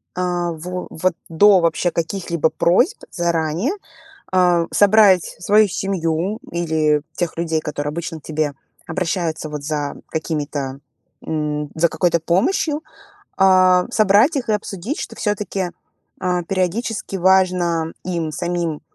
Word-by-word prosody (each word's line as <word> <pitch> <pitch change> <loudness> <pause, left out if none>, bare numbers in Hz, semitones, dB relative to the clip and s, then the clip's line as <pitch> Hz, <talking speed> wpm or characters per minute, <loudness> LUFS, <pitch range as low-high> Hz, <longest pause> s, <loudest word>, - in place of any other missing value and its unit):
а, 175 -1 -1
во 180 +3 -6
вот, 185 +3 0 0.2
до 190 +4 +6
вообще 170 +1 +1
каких-либо 170 -2 -1
просьб 245 - +2
заранее, 170 - 0 0.6
а, 175 -2 +3
собрать 205 -3 +5
свою 210 +3 +4
семью 185 +1 -1
или 155 -3 +1
тех 175 -2 -3
людей, 165 -2 -1
которые 150 -1 -3
обычно 165 0 -5
к - - -38
тебе 155 -2 -2 0.3
обращаются 165 -3 -2
вот 150 -1 -6
за 145 -1 -3
какими-то, 145 -4 -3 0.5
м, 150 -1 -2
за 170 +2 +3
какой-то 170 +1 +1
помощью, 290 - +1 0.5
а, 185 -1 +5
собрать 215 - +4
их 250 -4 -2
и - - +2
обсудить, 210 - -3
что - - -6
всё-таки, 205 -4 -2 0.5
а, 180 -1 0
периодически 195 +3 -2
важно 180 -3 +2
им 170 -4 -2
самим 170 -1 -2
175 Hz, 125 wpm, -20 LUFS, 160-190 Hz, 0.6 s, до